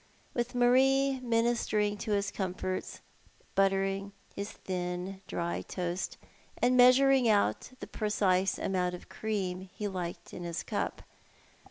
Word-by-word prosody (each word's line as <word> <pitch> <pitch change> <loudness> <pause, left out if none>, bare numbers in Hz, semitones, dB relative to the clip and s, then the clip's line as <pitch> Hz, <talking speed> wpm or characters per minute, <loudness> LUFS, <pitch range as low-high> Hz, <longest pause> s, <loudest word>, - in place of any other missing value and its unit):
with 240 +1 -2
Marie 265 +2 +4
ministering 230 -3 +1
to 215 - -6
liis 200 -1 0
comforts, 185 -1 -3 0.5
buttering 195 0 +1 0.2
liis 200 0 -3
thin 180 0 -4
dry 170 0 -2
toast, 180 0 -3 0.4
and 250 +1 +3
measuring 255 0 +6
out 205 -2 +2
the - - -4
precise 195 -3 +1
amount 180 -1 0
of 175 - -13
cream 190 -4 -3
he 210 - -3
liked 175 -3 -5
in - - -7
his 170 -1 -3
cup. - - -3
200 Hz, 125 wpm, -31 LUFS, 185-240 Hz, 0.5 s, measuring